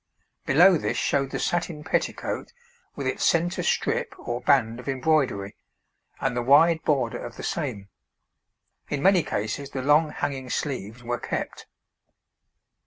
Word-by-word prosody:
Below 175 +5 +6
this - - -2
showed 140 -1 +1
the - - -3
satin 170 -3 -2
petticoat 160 - -2 0.4
with - - -5
its - - -1
centre 175 +1 +2
strip - - -1
or 120 +1 -4
band 125 -5 +2
of 125 - -7
embroidery, 130 -8 0 0.6
and 135 -2 -1
the 120 - 0
wide 160 +6 +5
border 130 -6 0
of 120 - -8
the - - -7
same. 125 - -3 1.0
In 145 -1 -2
many 190 -2 +5
cases 115 +2 -3
the 130 -2 -4
long 150 +3 +4
hanging 135 -3 -4
sleeves 120 -4 -4
were 120 0 -2
kept. - - -5
140 Hz, 140 wpm, -25 LUFS, 120-155 Hz, 1.0 s, Below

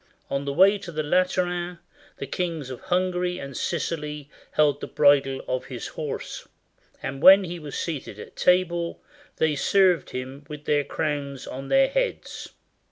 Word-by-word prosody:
On 140 0 -1
the 140 - -1
way 195 +7 +5
to 175 - -8
the 155 -1 -2
Lateran 180 +1 0 0.4
the - - -5
kings 160 -2 -3
of 130 - -8
Hungary 180 -1 0
and 140 -3 -7
Sicily 150 -4 -3 0.2
held 145 -2 +3
the - - -4
bridle 140 -2 +3
of 130 0 -2
his 125 -4 -6
horse; - - -6 0.6
and 135 +1 -4
when 195 +3 +9
he 175 -1 -5
was 150 -3 -6
seated 145 - -4
at - - -11
table 175 -2 +1 0.3
they 155 -2 +2
served 185 +1 +3
him 130 +3 -6
with 150 -1 -8
their 145 -1 +2
crowns 140 -2 -3
on 135 +1 -7
their 270 - +5
heads. - - -2
155 Hz, 160 wpm, -25 LUFS, 140-180 Hz, 0.6 s, when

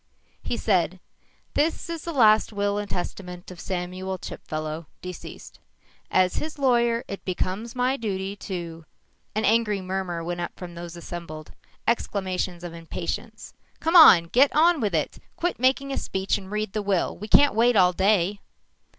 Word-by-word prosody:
He 240 - -3
said, 185 -3 +1 0.5
"This 320 +3 0
is 335 -2 -5
the 340 - -3
last 220 -8 +5
will 205 0 0
and 205 -1 -5
testament 180 0 -5
of 180 - -11
Samuel 185 +1 -4
Chipfellow, 155 -2 -6
deceased. 180 -2 -9 0.5
As 185 -1 +2
his 310 0 -4
lawyer, 240 -3 +2
it 200 - -7
becomes 195 +6 -3
my 255 +2 +1
duty 195 -3 -3
to 170 -5 -6 0.2
" - - -43
An 215 - +1
angry 215 -2 +2
murmur 185 -2 -3
went 175 +1 -3
up 175 - -4
from 180 -1 -8
those 170 0 -8
assembled. 165 -3 -8 0.4
Exclamations 185 -5 -1
of 175 -1 -6
impatience. 165 -1 -6 0.3
"Come 325 +2 0
on! 310 - +10
Get 250 +12 +4
on 325 0 +4
with 205 -6 0
it. 155 - -1 0.2
Quit 350 -5 -2
making 265 +2 +2
a - - -1
speech 190 0 -1
and 190 -2 -6
read 210 -1 -3
the 215 - -1
will, 195 -3 0
we 210 - -8
can't 285 +6 +6
wait 235 +2 +3
all 180 -2 +5
day!" 195 +1 +2
195 Hz, 165 wpm, -25 LUFS, 175-235 Hz, 0.5 s, on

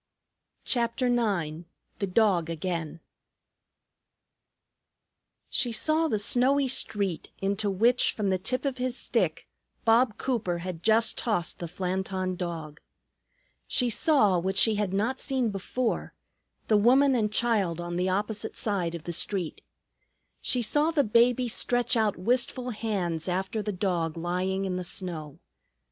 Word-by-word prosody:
CHAPTER 235 +1 0
IX 175 -9 -1 0.3
THE 200 - -1
DOG 185 -4 +2
AGAIN 165 -1 -4 2.5
She 245 -3 +2
saw 310 +8 +2
the 220 - 0
snowy 255 +6 +3
street, 200 -8 0
into 200 +2 -1
which, 230 +6 +3
from 200 -3 -1
the 185 - 0
tip 255 +9 -2
of 265 -2 -2
his 255 0 -1
stick, - - -1 0.4
Bob 225 0 +3
Cooper 220 -9 -1
had 170 -1 -6
just 220 +3 +3
tossed 210 -8 -2
the 170 - -4
Flanton 185 +1 -3
Dog. 165 -4 -6 0.9
She 245 -3 +1
saw, 215 - +4
what 190 +2 -2
she 225 - +5
had 205 -2 -1
not 220 +7 -1
seen 260 -5 0
before, 225 +5 -3 0.5
the 215 - +4
woman 265 +6 +4
and 215 -4 0
child 215 -7 +1
on 175 0 -5
the 180 +1 0
opposite 210 +3 -2
side 180 -6 -1
of 165 - -8
the 170 - -5
street. 180 -1 -2 0.8
She 250 -2 +2
saw 295 +7 +2
the 310 -3 +2
baby 240 +2 +3
stretch 245 +1 0
out 220 -3 +1
wistful 245 +5 0
hands 195 -8 -3
after 190 +4 -2
the 210 - -3
dog 175 -4 -2
lying 185 +3 -2
in 185 -1 -2
the 180 - -3
snow. 160 -5 -5
205 Hz, 140 wpm, -27 LUFS, 180-240 Hz, 2.5 s, she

